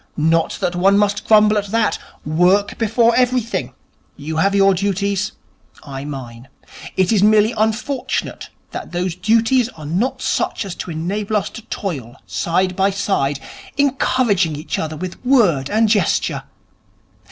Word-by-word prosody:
Not 165 Hz, +1 st, +1 dB
that 175 Hz, -, -1 dB
one 195 Hz, +3 st, +4 dB
must 205 Hz, 0 st, 0 dB
grumble 215 Hz, -1 st, +5 dB
at 205 Hz, -, -5 dB
that. 220 Hz, +1 st, 0 dB, 0.3 s
Work 180 Hz, +6 st, +2 dB
before 230 Hz, +1 st, +3 dB
everything. 250 Hz, -2 st, 0 dB, 0.4 s
You 155 Hz, +2 st, -5 dB
have 195 Hz, +5 st, +2 dB
your 195 Hz, 0 st, +5 dB
duties, 200 Hz, +1 st, -1 dB, 0.5 s
I 135 Hz, -1 st, -7 dB
mine. 130 Hz, -4 st, -8 dB, 0.5 s
It 185 Hz, +1 st, +2 dB
is 210 Hz, -4 st, +3 dB
merely 215 Hz, +1 st, +5 dB
unfortunate 220 Hz, +5 st, -2 dB, 0.2 s
that -, -, -7 dB
those 175 Hz, 0 st, -1 dB
duties 225 Hz, +5 st, +2 dB
are 155 Hz, -10 st, -11 dB
not 185 Hz, -, -1 dB
such -, -, -1 dB
as 190 Hz, -, -5 dB
to -, -, -6 dB
enable 200 Hz, +6 st, -2 dB
us 205 Hz, -, -3 dB
to -, -, -9 dB
toil 135 Hz, -, -5 dB
side 180 Hz, +2 st, 0 dB
by 195 Hz, +1 st, +2 dB
side, 145 Hz, -8 st, -1 dB, 0.4 s
encouraging 255 Hz, -, +1 dB
each 150 Hz, +2 st, -4 dB
other 155 Hz, -1 st, -4 dB
with 185 Hz, +6 st, -7 dB
word 205 Hz, -, +3 dB
and 220 Hz, +1 st, +3 dB
gesture. 205 Hz, -6 st, +1 dB
195 Hz, 145 wpm, -19 LUFS, 165-220 Hz, 0.5 s, grumble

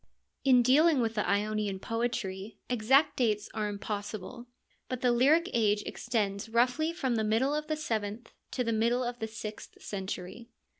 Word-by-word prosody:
In 255 Hz, -3 st, +5 dB
dealing 295 Hz, +4 st, +5 dB
with 225 Hz, -2 st, 0 dB
the 210 Hz, -2 st, -1 dB
Ionian 205 Hz, -1 st, 0 dB
poetry, 225 Hz, -3 st, -3 dB
exact 250 Hz, +5 st, +3 dB
dates 215 Hz, -4 st, +1 dB
are 210 Hz, -1 st, -1 dB
impossible, 205 Hz, +3 st, -5 dB, 0.4 s
but 255 Hz, -1 st, -3 dB
the 250 Hz, -, +3 dB
lyric 290 Hz, +8 st, +4 dB
age 210 Hz, -3 st, +2 dB
extends 215 Hz, -2 st, -2 dB
roughly 250 Hz, +8 st, +2 dB
from 260 Hz, -8 st, -1 dB
the 220 Hz, -, +1 dB
middle 225 Hz, +7 st, +2 dB
of 300 Hz, 0 st, -2 dB
the 310 Hz, -, -1 dB
seventh 220 Hz, -5 st, -3 dB, 0.2 s
to 250 Hz, -, -1 dB
the 230 Hz, -1 st, 0 dB
middle 235 Hz, +3 st, +2 dB
of 245 Hz, 0 st, -4 dB
the 220 Hz, -, -2 dB
sixth 215 Hz, -1 st, -8 dB
century. 195 Hz, +3 st, -6 dB
230 Hz, 160 wpm, -30 LUFS, 210-250 Hz, 0.4 s, In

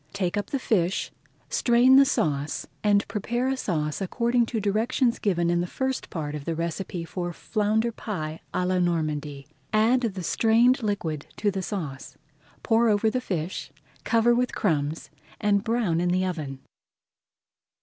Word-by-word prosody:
Take 190 Hz, -2 st, -1 dB
up 205 Hz, -, -2 dB
the 275 Hz, -, -1 dB
fish, 195 Hz, -8 st, 0 dB, 0.4 s
strain 245 Hz, +2 st, +5 dB
the 275 Hz, +1 st, +8 dB
sauce, 145 Hz, -, -1 dB, 0.2 s
and 205 Hz, -1 st, +3 dB
prepare 240 Hz, +4 st, -1 dB
a 270 Hz, -, +1 dB
sauce 155 Hz, -, -2 dB
according 235 Hz, +4 st, +1 dB
to 225 Hz, -, -2 dB
directions 225 Hz, +4 st, +1 dB
given 175 Hz, -4 st, +1 dB
in 175 Hz, 0 st, +2 dB
the 175 Hz, -, -2 dB
first 265 Hz, +6 st, -3 dB
part 150 Hz, -3 st, -4 dB
of 150 Hz, -2 st, -5 dB
the 165 Hz, -, -2 dB
recipe 170 Hz, +1 st, -3 dB
for 175 Hz, +1 st, -4 dB
Flounder 215 Hz, +5 st, 0 dB
Pie 160 Hz, -9 st, -5 dB
à 180 Hz, -, 0 dB
la 185 Hz, 0 st, +1 dB
Normandy. 155 Hz, -5 st, -1 dB, 0.3 s
Add 225 Hz, +4 st, +3 dB
the 195 Hz, -6 st, -2 dB
strained 235 Hz, +8 st, +3 dB
liquid 170 Hz, -9 st, -2 dB
to 205 Hz, -, +1 dB
the 190 Hz, -1 st, -3 dB
sauce, 155 Hz, -9 st, -5 dB, 0.5 s
pour 230 Hz, 0 st, +3 dB
over 215 Hz, +1 st, +2 dB
the 255 Hz, -, -1 dB
fish, 180 Hz, -5 st, -4 dB, 0.3 s
cover 230 Hz, +1 st, +3 dB
with 250 Hz, +1 st, 0 dB
crumbs, 155 Hz, -4 st, -1 dB, 0.3 s
and 205 Hz, -1 st, +2 dB
brown 220 Hz, -8 st, +1 dB
in 175 Hz, -, +1 dB
the 185 Hz, +1 st, +1 dB
oven. 150 Hz, -7 st, -4 dB
200 Hz, 160 wpm, -26 LUFS, 165-230 Hz, 0.5 s, the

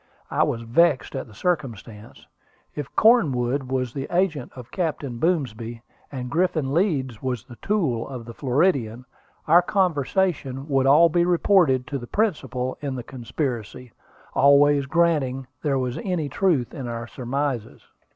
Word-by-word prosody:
I -, -, +1 dB
was 115 Hz, -, 0 dB
vexed 135 Hz, +4 st, +2 dB
at -, -, -4 dB
the 110 Hz, -, -16 dB
circumstance. 115 Hz, -, -4 dB, 0.5 s
If 145 Hz, -3 st, -7 dB
Cornwood 140 Hz, -, +3 dB
was 130 Hz, -2 st, -1 dB
the 135 Hz, -1 st, -4 dB
agent 170 Hz, -7 st, 0 dB
of 125 Hz, -1 st, -11 dB
Captain 145 Hz, -8 st, -3 dB
Boomsby, 120 Hz, -9 st, -1 dB, 0.3 s
and 125 Hz, -3 st, -5 dB
Griffin 160 Hz, -6 st, 0 dB
Leeds 140 Hz, -, 0 dB
was 125 Hz, -4 st, -3 dB
the 120 Hz, -, -13 dB
tool 160 Hz, -, -1 dB
of 125 Hz, -4 st, -7 dB
the 115 Hz, -, -9 dB
Floridian, 125 Hz, -3 st, 0 dB, 0.4 s
our 170 Hz, +3 st, +7 dB
conversation 175 Hz, -6 st, 0 dB
would 135 Hz, -2 st, +2 dB
all 160 Hz, +5 st, +6 dB
be 170 Hz, +2 st, +2 dB
reported 175 Hz, -7 st, +3 dB
to 140 Hz, -2 st, -4 dB
the 120 Hz, -, -9 dB
principal 135 Hz, -, -1 dB
in 140 Hz, -3 st, -3 dB
the 125 Hz, -, -5 dB
conspiracy, 125 Hz, -2 st, -5 dB, 0.4 s
always 140 Hz, 0 st, +5 dB
granting 145 Hz, -5 st, +1 dB, 0.2 s
there 140 Hz, -3 st, 0 dB
was 125 Hz, -1 st, -2 dB
any 180 Hz, -9 st, -2 dB
truth 150 Hz, -4 st, +1 dB
in 135 Hz, -6 st, -6 dB
our 115 Hz, 0 st, -4 dB
surmises. 125 Hz, -1 st, -4 dB
135 Hz, 145 wpm, -24 LUFS, 125-165 Hz, 0.5 s, our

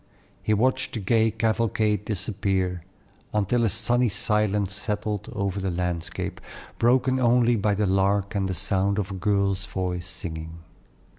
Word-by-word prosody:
He 110 Hz, -, +1 dB
watched 130 Hz, +4 st, +1 dB
the -, -, -2 dB
gay 110 Hz, +3 st, +3 dB
cavalcade 110 Hz, -2 st, 0 dB
disappear, 95 Hz, -3 st, -1 dB, 0.5 s
until 105 Hz, +3 st, +2 dB
a 115 Hz, -, +3 dB
sunny 120 Hz, +4 st, +2 dB
silence 105 Hz, -1 st, 0 dB
settled 105 Hz, 0 st, -3 dB
over 100 Hz, 0 st, -2 dB
the 95 Hz, -, -1 dB
landscape, 90 Hz, -2 st, -3 dB, 0.4 s
broken 130 Hz, +2 st, +3 dB
only 120 Hz, -1 st, +4 dB
by 105 Hz, -1 st, +1 dB
the 105 Hz, +1 st, +1 dB
larks 100 Hz, +2 st, +1 dB
and 95 Hz, -1 st, 0 dB
the 95 Hz, -, -2 dB
sound 100 Hz, +2 st, 0 dB
of 100 Hz, -1 st, -2 dB
a -, -, -4 dB
girl's 100 Hz, -1 st, 0 dB
voice 90 Hz, -2 st, -3 dB
singing. 80 Hz, -1 st, -7 dB
100 Hz, 145 wpm, -25 LUFS, 95-110 Hz, 0.5 s, only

